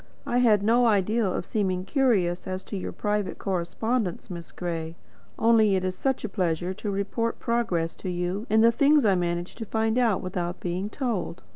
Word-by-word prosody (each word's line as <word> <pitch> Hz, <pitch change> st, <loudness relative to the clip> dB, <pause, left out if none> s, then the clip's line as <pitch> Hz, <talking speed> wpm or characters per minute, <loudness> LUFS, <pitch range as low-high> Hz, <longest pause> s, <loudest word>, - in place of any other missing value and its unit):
"I 245 Hz, -, +1 dB
had 215 Hz, -5 st, +4 dB
no 235 Hz, +3 st, +4 dB
idea 215 Hz, +2 st, +2 dB
of 180 Hz, -, -2 dB
seeming 185 Hz, -4 st, -1 dB
curious 195 Hz, -9 st, +1 dB
as 185 Hz, 0 st, -4 dB
to -, -, -7 dB
your 190 Hz, -, -4 dB
private 210 Hz, -2 st, -2 dB
correspondence, 195 Hz, +2 st, -2 dB
Miss 170 Hz, -1 st, -8 dB
Gray. 165 Hz, -2 st, -4 dB, 0.4 s
Only 220 Hz, -3 st, +4 dB
it 185 Hz, -, 0 dB
is 185 Hz, 0 st, -2 dB
such 265 Hz, +4 st, -1 dB
a -, -, -1 dB
pleasure 175 Hz, -1 st, -1 dB
to 205 Hz, +2 st, -5 dB
report 200 Hz, +4 st, -1 dB
progress 200 Hz, -9 st, -1 dB
to 185 Hz, -, -5 dB
you 180 Hz, +5 st, -2 dB
in 220 Hz, +1 st, +4 dB
the 230 Hz, +1 st, +6 dB
things 285 Hz, +2 st, +4 dB
I 200 Hz, -, +5 dB
manage 175 Hz, -1 st, -1 dB
to 225 Hz, -, -5 dB
find 220 Hz, +2 st, +1 dB
out 225 Hz, -6 st, +2 dB
without 180 Hz, -1 st, -3 dB
being 180 Hz, +3 st, -3 dB
told." 230 Hz, -10 st, -3 dB
200 Hz, 185 wpm, -26 LUFS, 180-230 Hz, 0.4 s, the